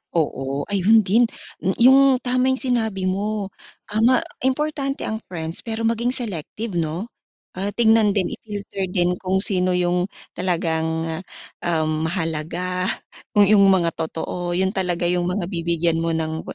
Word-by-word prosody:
Oo, 140 -3 -1
ayun 205 +3 +5
din! 215 +6 +4 0.4
Mm, 190 - 0
yung 265 +3 +8 0.2
tama 255 +1 +1
yung 260 - -1
sinabi 220 -7 0
mo, 200 0 -2 0.4
ah, 215 - 0
ma 255 +2 +6 0.3
importante 275 0 -1
ang 220 0 -2
friends, 165 -2 -4
pero 225 0 -3
maging 235 +2 +1
selective 210 - -3
'no? 165 +5 -2 0.5
Ah, 195 +2 -1
tignan 220 -3 +4
din, 185 - 0
i-filter 200 -3 -5
din 180 -1 +1
kung 190 0 0
sino 185 -2 +2
yung 180 +1 +1 0.2
talagang, 165 -2 -1 0.6
um, 160 -2 0 0.2
mahalaga, 175 +2 -2 0.4
kung 205 -1 +6
yung 205 0 +5
mga 170 -3 +3
totoo, 175 +2 -3
yun 190 +1 +1
talaga 180 -3 -1
yung 175 0 +1
mga 180 -1 -1
bibigyan 170 -1 0
mo 165 - 0
ng 160 0 -2
185 Hz, 145 wpm, -22 LUFS, 170-220 Hz, 0.6 s, yung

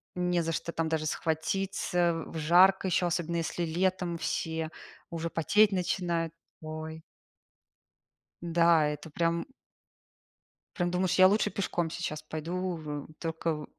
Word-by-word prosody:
Не 180 -1 +1
за 165 0 -1
что 170 +1 -3
там 165 -1 -1
даже 160 -1 0
схватиться, 170 +1 0
в - - -7
жарко 180 +5 +5
еще, 180 0 +2
особенно 170 -1 -1
если 170 +1 -2
летом 180 +1 0
все 160 -1 -2 0.4
уже 170 -1 -3
потеть 205 +6 +4
начинают. 175 -3 -1 0.3
Ой! 155 0 -6 1.4
Да, 170 -2 +4
это 150 +1 -5
прям 170 +2 0 1.3
прям 175 -3 0
думаешь, 180 0 +1
я 185 0 +8
лучше 210 +2 +2
пешком 175 -4 -1
сейчас 160 -2 -4
пойду, 175 +4 -3
в 150 -2 -6
только 160 -2 -2
170 Hz, 125 wpm, -29 LUFS, 160-180 Hz, 1.4 s, я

